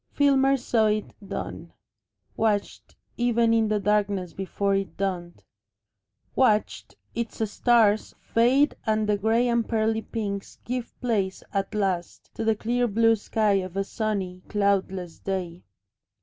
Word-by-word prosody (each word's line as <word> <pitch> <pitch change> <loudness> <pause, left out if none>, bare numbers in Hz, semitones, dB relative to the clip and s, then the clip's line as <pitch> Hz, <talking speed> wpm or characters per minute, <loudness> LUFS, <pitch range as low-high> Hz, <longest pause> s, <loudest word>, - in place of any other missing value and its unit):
Filmer 275 -1 +3
saw 230 -3 +2
it 210 0 -1
dawn, 195 - -6 0.6
watched 210 -2 -1 0.2
even 235 -1 +3
in 225 -1 +3
the 210 0 +1
darkness 200 -3 0
before 195 +1 -1
it 195 0 -2
dawned, 180 -3 -3 0.9
watched 215 -5 +1 0.2
its 230 -1 -2
stars 220 -3 +3
fade 260 +6 +3
and 215 -1 +1
the 210 - +3
grey 225 +4 +2
and 235 -1 +1
pearly 220 -1 +1
pinks 200 -4 -5
give 245 -1 -4
place 205 -6 -1
at 195 +1 -2
last 190 -4 -2
to - - -4
the 220 0 +2
clear 240 +3 0
blue 225 +1 +4
sky 215 0 +1
of 185 0 -6
a 195 - +1
sunny, 195 -4 -3
cloudless 195 -4 0
day. 180 -3 -4
215 Hz, 135 wpm, -26 LUFS, 195-230 Hz, 0.9 s, blue